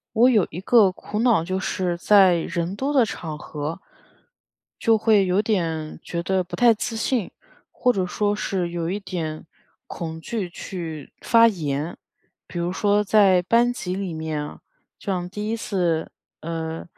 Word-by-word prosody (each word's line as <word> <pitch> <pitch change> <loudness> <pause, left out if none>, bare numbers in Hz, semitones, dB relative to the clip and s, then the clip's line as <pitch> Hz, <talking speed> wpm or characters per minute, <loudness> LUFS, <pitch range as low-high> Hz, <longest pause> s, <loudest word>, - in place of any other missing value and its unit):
我 240 +3 +6
有 215 -7 +4
一 175 - -6
个 205 0 +5
苦 210 +3 -5
恼 230 -8 +3
就 185 +2 -2
是 180 -2 -1
在 190 0 +5
人 170 +2 -2
多 270 +7 -2
的 265 -4 +5
场 155 -7 -6
合， 150 +4 -5 1.0
就 225 -2 +3
会 210 -2 +4
有 185 +2 +2
点 165 -8 -2
觉 170 - -4
得 190 0 +1
不 180 - -7
太 240 -2 +5
自 225 +2 -4
信， 225 -2 -1 0.4
或 250 - +1
者 190 -4 0
说 205 +3 0
是 185 -4 -2
有 170 -1 -3
一 195 - -2
点 165 -6 -5 0.4
恐 160 -1 -6
惧 200 -1 -4
去 165 -6 -7
发 230 0 +5
言。 155 -6 -2 0.5
比 175 - -6
如 170 +1 -1
说 205 +2 +2
在 195 -3 +5
班 235 +6 +3
级 185 -7 -4
里 190 -2 -3
面， 160 -2 -4 0.4
就 200 - -3
像 180 -1 -3
第 210 +2 -4
1 225 - -1
次， 175 -7 -1 0.3
呃， 165 0 -4
185 Hz, 175 characters per minute, -23 LUFS, 165-210 Hz, 1.0 s, 我